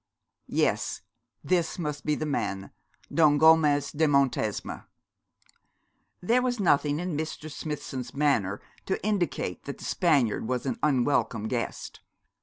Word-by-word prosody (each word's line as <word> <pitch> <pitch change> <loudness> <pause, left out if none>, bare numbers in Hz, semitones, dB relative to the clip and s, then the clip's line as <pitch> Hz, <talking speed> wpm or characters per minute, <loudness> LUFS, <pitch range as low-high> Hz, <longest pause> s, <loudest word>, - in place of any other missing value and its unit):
Yes, - - 0 0.4
this 175 -3 0
must 150 -4 -4
be 150 - +2
the 155 - -3
man, 100 -9 -3 0.4
Don 150 -3 +5
Gomez 155 -2 +4
de 160 +1 +2
Montesma. 135 -7 0 1.3
There 235 +7 +3
was 245 -2 -1
nothing 150 -5 +2
in 175 -2 -3
Mr. 155 0 -5
Smithson's 140 -4 -5
manner 125 -9 +1 0.3
to 190 - 0
indicate 185 - -1
that 140 - -6
the - - -10
Spaniard 135 - +1
was 125 0 -2
an 235 - -2
unwelcome 120 -6 +1
guest. 120 0 -4
150 Hz, 125 wpm, -27 LUFS, 130-160 Hz, 1.3 s, Don